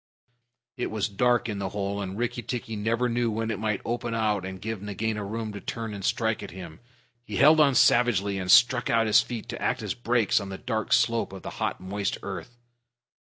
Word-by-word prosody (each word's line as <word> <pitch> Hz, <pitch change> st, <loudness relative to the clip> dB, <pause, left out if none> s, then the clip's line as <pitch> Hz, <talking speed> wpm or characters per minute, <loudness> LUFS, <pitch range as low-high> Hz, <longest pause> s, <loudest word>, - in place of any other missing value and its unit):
It 125 Hz, -, -1 dB
was 110 Hz, -2 st, -1 dB
dark 120 Hz, +4 st, +1 dB
in 105 Hz, -3 st, -3 dB
the 95 Hz, -1 st, -2 dB
hole; 100 Hz, 0 st, -3 dB
and 95 Hz, 0 st, -5 dB
Rikki 120 Hz, +1 st, -2 dB
tikki 115 Hz, -1 st, -4 dB
never 115 Hz, +4 st, 0 dB
knew 120 Hz, 0 st, 0 dB
when 110 Hz, +1 st, -2 dB
it 105 Hz, -, -3 dB
might 105 Hz, -2 st, -1 dB
open 120 Hz, 0 st, -2 dB
out 105 Hz, -4 st, 0 dB
and 95 Hz, 0 st, -6 dB
give 110 Hz, -1 st, -5 dB
Nagaina 105 Hz, +1 st, -3 dB
room 110 Hz, +1 st, -4 dB
to 100 Hz, -, -7 dB
turn 115 Hz, -2 st, -5 dB
and 100 Hz, -1 st, -7 dB
strike 110 Hz, +2 st, 0 dB
at 100 Hz, -, -7 dB
him. 90 Hz, -3 st, -10 dB, 0.4 s
He 105 Hz, -3 st, -7 dB
held 155 Hz, +6 st, +6 dB
on 140 Hz, -3 st, +5 dB
savagely, 100 Hz, -7 st, +3 dB
and 90 Hz, -1 st, -4 dB
stuck 120 Hz, +5 st, +5 dB
out 115 Hz, -1 st, +3 dB
his 110 Hz, -, +5 dB
feet 120 Hz, -3 st, -6 dB
to -, -, -6 dB
act -, -, -1 dB
as -, -, -2 dB
brakes 120 Hz, -3 st, +1 dB
on 100 Hz, -1 st, -6 dB
the 95 Hz, -, -6 dB
dark 110 Hz, -2 st, -3 dB
slope 115 Hz, -3 st, +2 dB
of 95 Hz, -, -9 dB
the -, -, -6 dB
hot, -, -, -1 dB
moist 100 Hz, +2 st, -3 dB
earth. 120 Hz, 0 st, -7 dB
110 Hz, 220 wpm, -26 LUFS, 100-120 Hz, 0.4 s, held